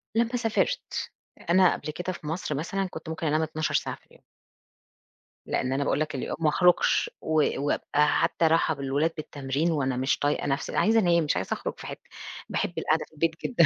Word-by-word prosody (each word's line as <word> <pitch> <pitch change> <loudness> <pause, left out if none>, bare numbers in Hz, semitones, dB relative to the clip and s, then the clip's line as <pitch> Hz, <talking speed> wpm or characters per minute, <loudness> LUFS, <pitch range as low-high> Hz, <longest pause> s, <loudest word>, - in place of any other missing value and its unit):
لما 235 +2 +2
سافرت، 245 - -1 0.4
أنا 185 0 +5
قبل 155 - -5
كده 180 +4 -4
في 165 - -9
مصر 160 -1 -2
مثلًا 190 +6 -2
كنت 160 +1 -8
ممكن 160 0 -3
أنام 155 +1 +2
12 155 0 -2
ساعة - - 0
في - - -26
اليوم. - - -23 1.2
لأن 130 0 -1
أنا 140 +1 0
باقول 140 - +1
لك 155 -1 -2
اليوم 130 - -3
ما 160 -2 +3
أخرجش 180 - +3
و 155 -1 +2 0.2
وابقى 145 +1 +1
حتى 165 0 +2
راحة 160 0 +3
بالولاد 140 +3 0
بالتمرين 145 +2 -2
وأنا 135 -5 0
مش 130 +2 +1
طايقة 145 +1 0
نفسي 140 0 -2
عايزة 225 +2 +4
أنام 170 -4 +3
مش 150 - 0
عايزة 95 - -1
أخرج - - -4
في - - -8
حتة، - - -9 0.4
باحب - - -1
القعدة - - +1
في - - -31
البيت 160 +1 -1
جدًا، 200 -10 +4
160 Hz, 195 wpm, -27 LUFS, 145-175 Hz, 1.2 s, أنا